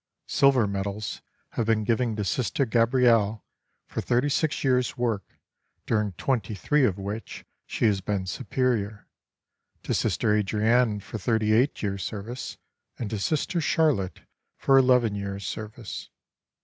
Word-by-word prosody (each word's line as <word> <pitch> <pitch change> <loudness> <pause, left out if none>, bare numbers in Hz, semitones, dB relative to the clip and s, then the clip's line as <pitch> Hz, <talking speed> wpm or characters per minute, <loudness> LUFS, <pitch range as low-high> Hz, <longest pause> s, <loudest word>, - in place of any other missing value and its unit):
Silver 135 -5 +4
medals 100 +1 -3 0.3
have 115 - -2
been 110 -1 +2
given 115 0 +1
to 105 - -2
Sister 130 +7 0
Gabrielle 115 -3 +3 0.4
for - - -4
thirty 125 +4 +1
six 155 +2 0
years' 125 -2 +1
work, 115 -6 -2 0.5
during 105 -3 0
twenty 110 -1 -1
three 145 +7 +2
of 100 -5 0
which 100 +3 -6 0.2
she - - -1
has 100 -3 +2
been 100 -1 -2
Superior; 110 -2 -1 0.8
to - - -1
Sister 105 - +1
Adrienne 105 +2 +2
for 110 - -7
thirty 110 +1 +1
eight 125 +4 +2
years' 100 -1 -2
service, 110 +4 -6 0.4
and 110 -4 -4
to 110 - -2
Sister 155 - 0
Charlotte 145 - +1 0.4
for 135 - +3
eleven 125 -4 +5
years' 100 -1 -4
service. 110 +2 -6
110 Hz, 135 wpm, -26 LUFS, 100-125 Hz, 0.8 s, eleven